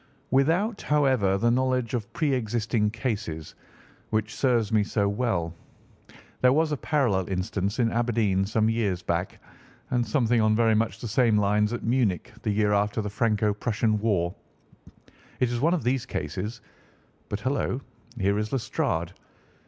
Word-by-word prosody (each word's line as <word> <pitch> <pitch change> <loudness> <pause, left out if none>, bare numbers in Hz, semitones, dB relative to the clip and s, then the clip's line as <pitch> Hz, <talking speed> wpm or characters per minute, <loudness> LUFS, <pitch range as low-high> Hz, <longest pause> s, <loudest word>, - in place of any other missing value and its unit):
"Without, 165 - +2
however, 130 -10 +2
the 120 +4 +2
knowledge 130 -1 0
of 115 -4 -3
pre 150 -4 0
existing 115 -2 0
cases 105 - -4 0.6
which 110 0 -1
serves 120 -5 +1
me 110 -2 +3
so 100 0 0
well. 100 -6 -1 0.9
There 125 - +6
was 155 +1 +2
a 150 - 0
parallel 120 - 0
instance 95 +2 -2
in 115 -3 +2
Aberdeen 115 -5 +1
some 110 +1 +1
years 105 -6 0
back, 85 +3 -2 0.5
and 125 -1 +2
something 120 -3 +2
on 110 0 +3
very 115 0 +3
much 110 +1 0
the 120 - -4
same 115 -1 +3
lines 105 +1 +2
at 120 - -4
Munich 115 - 0
the - - -2
year 105 0 +2
after 105 +2 +1
the 105 -2 -3
Franco 105 -1 +1
Prussian 110 0 0
War. 95 -5 0 1.1
It 125 -1 +1
is 120 - -1
one 165 +7 +3
of 170 - -3
these 125 0 0
cases—but, 105 0 -7
hullo, 130 +1 -1 0.4
here 100 0 +1
is 105 0 -3
Lestrade! 85 -9 -1
110 Hz, 150 wpm, -26 LUFS, 100-125 Hz, 1.1 s, There